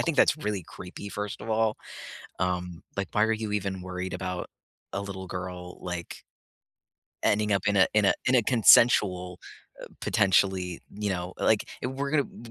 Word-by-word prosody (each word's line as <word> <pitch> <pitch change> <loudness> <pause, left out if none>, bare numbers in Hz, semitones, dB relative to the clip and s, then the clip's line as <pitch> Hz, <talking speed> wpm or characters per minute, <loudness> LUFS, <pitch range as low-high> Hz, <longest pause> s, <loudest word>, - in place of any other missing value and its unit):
think 165 -3 0
that's - - +5
really 105 - -3
creepy, 95 +3 -9
first 105 0 -5
of 110 - -5
all, 110 0 +2 0.6
um, 90 -1 -2
like, 100 -1 -2
"Why 105 - +3
are 110 0 +3
you 110 -1 -3
even 95 -2 -2
worried 90 0 -5
about 90 -1 -4 0.4
a 100 - -2
little 95 -1 -6
girl?" 90 -1 -7
Like 90 -2 -5 1.1
ending 105 0 +2
up 100 -1 +1
in 100 - +2
a 95 -2 +6
in 105 -1 +4
a - - +5
in 130 - +4
a 125 - +6
consensual, 100 -6 +5 0.4
uh, - - -8
potentially, 95 -3 +2 0.2
you 105 0 -2
know, 90 -1 -3
like, 110 - +2
if 125 - -2
we're 140 +1 -3
gonna 150 -2 +3
w - - -13
100 Hz, 180 wpm, -27 LUFS, 90-110 Hz, 1.1 s, a